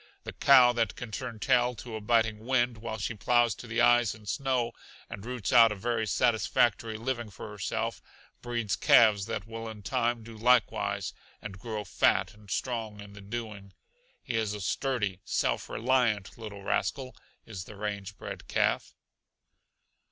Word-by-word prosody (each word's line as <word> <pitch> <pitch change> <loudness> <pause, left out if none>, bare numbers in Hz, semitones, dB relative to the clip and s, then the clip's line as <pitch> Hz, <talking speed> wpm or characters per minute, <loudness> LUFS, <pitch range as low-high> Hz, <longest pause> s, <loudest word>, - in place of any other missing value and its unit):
The - - -7
cow 125 -3 +6
that 115 -3 0
can 120 -3 -7
turn 120 -1 -5
tail 120 +3 +2
to 115 +1 -8
a 110 - -5
biting 110 -1 +2
wind 120 -1 +1
the - - -13
while 110 -1 -5
she 110 - -3
ploughs 120 +1 +2
to 125 - -11
the 115 +1 0
eyes 120 -3 +4
in 110 -1 -16
snow 125 +2 0 0.4
and 100 - -7
roots 120 -4 -3
out 115 -2 +8
a - - -2
very 110 +2 -1
satisfactory 110 0 +1
living 120 -1 -3
for 100 - -9
herself - - -3 0.4
breeds 120 -4 -1
calves 105 -4 +5
that 100 - -4
will 115 0 -6
in 105 -2 -10
time 115 +4 0
do 115 0 -11
likewise 120 +1 +1 0.3
and 100 -3 -8
grow 110 -1 -4
fat 90 - +2
and 105 -1 -18
strong 110 0 -3
in 105 0 -11
the 100 - -11
doing. 100 -2 -7 0.5
He 120 -3 -2
is 105 -2 -1
a 105 - -6
sturdy, 105 -1 -1
self - - -1
reliant 115 -4 +1
little 105 -3 -9
rascal, 130 +9 -1 0.3
is 100 -5 -7
the 105 - -11
range 100 -1 -5
bred - - -8
calf. - - 0
110 Hz, 170 wpm, -29 LUFS, 105-120 Hz, 0.5 s, out